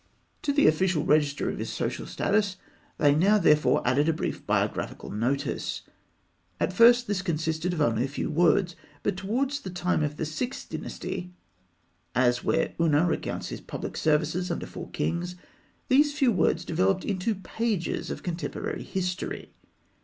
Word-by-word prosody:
To 290 - 0
the 285 +1 +3
official 160 -1 +3
register 145 -2 +2
of - - -3
his - - -3
social - - -3
status, 200 -2 0 0.4
they 145 -1 +4
now 195 +8 +4
therefore 150 -9 +3
added 145 +5 +3
a - - +3
brief 160 - -4
biographical - - -1
notice. 125 +7 -2 0.8
At - - 0
first, 240 +4 +6
this 205 -5 -1
consisted 160 0 -1
of 170 -3 -2
only 115 -1 +2
a - - -2
few 140 - -3
words; 175 +2 +3 0.3
but - - 0
towards 255 +9 -1
the 190 - -7
time 180 -1 0
of 150 0 -2
the - - -2
Sixth 245 - -4
Dynasty 180 -1 -5 0.8
(as 125 0 +3
where 160 0 +1
Ûna 165 0 +3
recounts 170 - -2
his - - -6
public - - -6
services 160 +4 +1
under 170 - -3
four - - -8
kings), 175 +1 -2 0.5
these 290 +2 +4
few 270 -5 +4
words 180 -6 +1
developed 185 +3 +1
into 205 +2 -1
pages 200 0 -2
of - - -5
contemporary 175 -1 -4
history. 180 -1 -4
175 Hz, 155 wpm, -27 LUFS, 155-200 Hz, 0.8 s, first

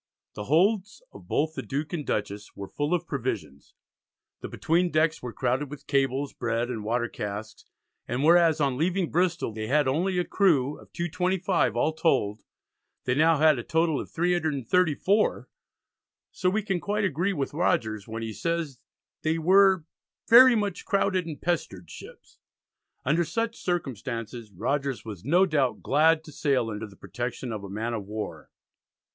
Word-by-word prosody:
The 105 - -6
holds 195 - +1
of - - -13
both 155 +2 0
the - - -4
Duke 145 +3 -4
and 160 -4 -2
Dutchess 105 -4 -4
were 100 - -7
full 145 - -3
of 175 - -3
provisions; 115 - -5 0.6
the - - -6
between 175 +2 +1
decks 160 0 +1
were 125 - -5
crowded 130 +4 -1
with 150 0 -10
cables, 135 0 0
bread, 120 +1 -2
and 110 -3 -5
water 120 +2 0
casks, 105 0 -6 0.4
and 125 +3 -2
whereas 165 -1 +5
on 135 -3 0
leaving 180 +1 0
Bristol 175 -8 0
they 110 0 -4
had 145 +2 +2
only 180 +8 0
a 180 - +2
crew 150 -8 +2
of - - -17
225 180 - 0
all 155 +6 +1
told, 110 -10 +1 0.6
they 125 - 0
now 160 +3 +4
had 155 -3 +4
a - - -5
total 160 0 +1
of - - -9
334, 175 - +1 0.8
so 180 - 0
we 210 +3 -1
can 190 -3 -1
quite 205 +3 -1
agree 175 +3 0
with 140 -6 -3
Rogers 110 - 0
when 115 0 -5
he 110 -1 -4
says 165 -2 -3 0.4
they 160 +1 0
were 190 +1 +4 0.4
"very 250 +1 +8
much 205 -4 -2
crowded 190 -3 0
and 155 -3 -6
pestered 95 - -3
ships." - - -13 0.7
Under 170 +3 +2
such 230 +7 -2
circumstances 120 - -4
Rogers 135 +7 -2
was 100 -5 -8
no 175 +9 +4
doubt 145 -8 0
glad 160 +2 +3
to 155 - -12
sail 130 -6 0
under 105 +1 -5
the 100 - -16
protection 125 +3 -5
of 105 -2 -5
a 100 - -7
man 110 +4 -3
of 105 -4 -5
war. 105 +1 -6
150 Hz, 165 wpm, -26 LUFS, 120-175 Hz, 0.8 s, very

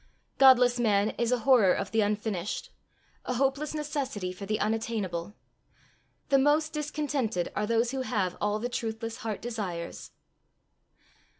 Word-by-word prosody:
Godless 250 -2 +6
man 210 -2 +2
is 235 0 +1
a 250 - +3
horror 240 -9 +6
of - - -3
the 225 - +2
unfinished 205 -2 -2 0.5
a 250 - -2
hopeless 275 +4 0
necessity 280 -11 -3
for 195 +2 -8
the 215 +1 -1
unattainable! 210 -4 -2 0.9
The 275 -1 +5
most 300 +3 +2
discontented 290 - -2
are 210 - -1
those 230 +1 +1
who 265 -1 -2
have 205 -8 -1
all 210 0 +1
the 230 +3 -2
truthless 225 -2 -4
heart 220 -2 -5
desires. 200 -8 -5
230 Hz, 135 wpm, -28 LUFS, 210-265 Hz, 0.9 s, Godless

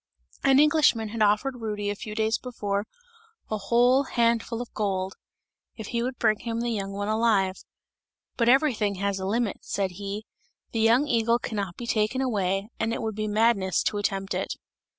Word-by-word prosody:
An 270 0 +5
Englishman 295 -7 +4
had 225 +1 -4
offered 215 +5 +2
Rudy 205 -2 -2
a - - -4
few 210 0 -7
days 220 0 +1
before, 205 -4 -3 0.6
a 215 - 0
whole 240 +6 +4
handful 235 -1 +1
of 245 - -7
gold, 190 -2 -2 0.6
if 220 -2 -7
he 235 - -1
would 250 +1 -3
bring 215 -2 +2
him 230 -1 -3
the 240 0 -1
young 195 -3 -3
one 205 +1 -3
alive, 215 -4 +2 0.8
"but 235 -1 +2
everything 245 -7 +3
has 200 0 -1
a 190 - -3
limit," 225 0 0
said 195 -2 -2
he, 200 +3 -6 0.5
"the 225 - -2
young 230 +5 +4
eagle 230 -1 +2
cannot 200 -7 -4
be 240 - -6
taken 220 +2 0
away, 200 -6 0
and 225 +1 0
it - - -3
would 220 -1 -2
be 215 +1 -3
madness 210 -3 +2
to 205 - -1
attempt 195 -1 -2
it!" - - -2
220 Hz, 180 wpm, -26 LUFS, 200-235 Hz, 0.8 s, An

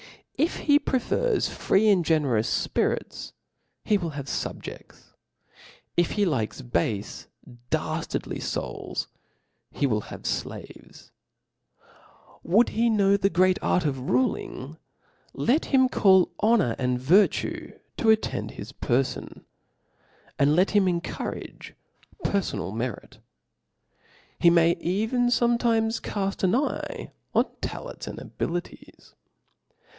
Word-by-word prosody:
If 325 - 0
he 290 -1 +5
prefers 420 - 0
free 205 +3 +2
and 190 -4 +4
generous 140 -9 +1
fpirits, - - -2 0.5
he 210 -2 +3
Mriil 170 -4 -4
h^ve.fabjeifls: 140 -1 -6 0.8
if 175 -1 +2
he 205 -1 +2
likes 130 - -2
barfe 105 -2 -2 0.4
daftardly - - -2 0.2
(buk, - - -4 0.7
be - - +3
will 110 -5 +1
have - - -10
flaV'es, - - -6 1.3
Would 210 +8 +3
he 230 +2 +1
know 200 -3 +4
the 195 0 +2
great 185 +1 +3
arc 180 - +1
of 140 -3 0
roHog 130 +1 -1
v 160 - -15 0.6
lee 260 +7 +2
him 260 -2 +4
call 190 -7 +4
honor 215 - +3
and 125 -1 0
virtue 180 +11 +2 0.2
to 225 - +2
at 220 0 +5
tend - - -3
his - - -9
p^ibn; 130 +2 -2 1.0
and 145 +2 +4
let 185 +3 +4
hitn 185 -4 +2
en43durage - - -6 0.5
peribnal 105 - -1
merit. 115 -2 -5 1.2
He 170 - +6
may 170 0 +5
even 220 +7 0
fometimes 235 -1 +2
caft 195 -1 -3
an 190 +3 +3
eye 285 +3 -2 0.2
on - - +5 0.2
ta - - -4
lents - - -8
and - - -6
abilities. 175 +1 -6
185 Hz, 115 wpm, -26 LUFS, 135-220 Hz, 1.3 s, He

